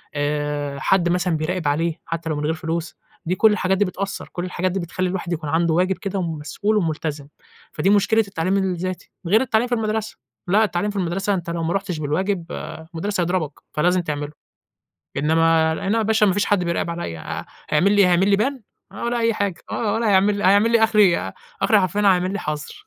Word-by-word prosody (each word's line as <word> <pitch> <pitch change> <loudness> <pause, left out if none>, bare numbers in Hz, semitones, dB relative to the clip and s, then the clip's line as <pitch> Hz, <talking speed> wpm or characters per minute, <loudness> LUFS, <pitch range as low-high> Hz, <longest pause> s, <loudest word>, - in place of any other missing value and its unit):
آآ، 145 -1 -2
حد 175 +4 +2
مثلًا 180 -1 +1
بيراقب 160 +1 -2
عليه، 160 +3 0
حتى 165 -1 -4
لو 155 - -1
من 150 - -3
غير 160 - +1
فلوس، 165 +1 -4 0.3
دي 180 +3 0
كل 220 +3 +5
الحاجات 190 -2 +1
دي 205 - +3
بتأثَّر، 195 +1 -5
كل 175 -1 -3
الحاجات 180 0 -1
دي 195 - -2
بتخلّي 185 +1 -2
الواحد 180 -2 -3
يكون 155 -3 -4
عنده 165 +1 +2
واجب 185 +3 +1
كده 195 -1 -3
ومسؤول 165 +5 -1
وملتزم، 155 -5 -2 0.5
فدي 195 - +1
مشكلة 205 +2 +3
التعليم 190 0 0
الذاتي، 185 -1 -3 0.2
غير 210 +6 +4
التعليم 235 -2 +1
في 245 - 0
المدرسة، 220 -1 -2 0.3
لأ 205 +5 +4
التعليم 205 -1 -1
في - - -13
المدرسة 195 +2 0
أنت 175 -3 -3
لو 170 0 -2
ما 165 +1 0
رُحتش 190 -4 -2
بالواجب، 175 +5 -1
آآ، 160 - -7
المُدرّس 200 +4 -2
هيضربَك، 175 -3 0 0.2
فلازم 180 +4 +2
تعمله، 150 -3 -4 0.9
إنما 160 +2 +3
أنا 195 +7 -1
يا - - +2
باشا 220 0 +3
ما 195 - +3
فيش 205 +2 +1
حد 205 -3 +2
بيراقب 170 0 -1
عليَّ، 170 - -4
ه - - -6 0.2
هيعملي 195 +7 +4
إيه، 190 - +6
هيعملي 190 +3 +3
Ban 260 +7 +1 0.4
ولا 235 0 -1
أي 230 0 +2
حاجة، 200 -4 -1 0.2
آه، 210 -3 -1
ولا 225 -1 +1
هيعمل 200 +1 +3
هيعمل 205 +4 +5
لي 230 -1 +4
آخري 220 -1 +4
إيه، 175 - +2
ي 95 - -8 0.3
آخري 215 - +4
حرفيًا 195 +2 0
هيعمل 185 -2 +3
لي 205 - -2
حظر 150 - -5
180 Hz, 205 wpm, -22 LUFS, 165-205 Hz, 0.9 s, إيه